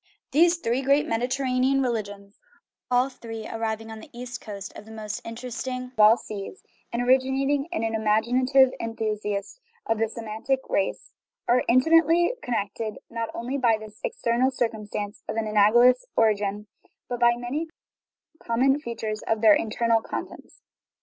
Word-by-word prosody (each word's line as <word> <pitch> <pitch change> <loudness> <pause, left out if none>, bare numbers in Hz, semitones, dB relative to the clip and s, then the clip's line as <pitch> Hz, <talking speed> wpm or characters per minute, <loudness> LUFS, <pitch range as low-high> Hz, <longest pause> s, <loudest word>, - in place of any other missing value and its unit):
These 335 +4 +4
three 255 -5 -1
great 275 +2 +3
Mediterranean 255 +3 +1
religions, 205 -4 -4 0.5
all 250 +1 +3
three 225 -4 -8
arising 225 0 -4
on 220 - -8
the 295 - -13
east 245 0 -6
coast 200 -2 -8
of 210 - -10
the 220 - -13
most 215 -1 -5
interesting 250 +2 -5
of 220 - -16
all 215 +2 +7
seas, 210 - -8 0.3
and 235 +1 -1
originating 265 +3 +2
in 335 - -2
an 225 0 -1
imaginative 250 +5 +3
enthusiast 215 - -3 0.3
of 225 -1 0
the 225 - +2
Se 230 - -7
mitic 225 +5 -2
race, 195 - -1 0.4
are 245 +1 +4
intimately 330 - +4
connected, 215 -1 -3
not 230 -1 -3
only 255 +4 -3
by 230 -3 +3
this 215 0 -12
external 240 +3 +1
circumstance 215 -5 -3
of - - -2
an 225 -1 -1
analogous 230 +4 +5
origin, 210 -2 +1 0.4
but 245 -1 -4
by 240 0 +5
many 250 +7 -3 0.7
common 265 +4 +2
features 220 -5 -4
of 220 -1 0
their 220 -2 +7
internal 225 +1 +1
contents. - - -8
235 Hz, 150 wpm, -25 LUFS, 215-255 Hz, 0.7 s, all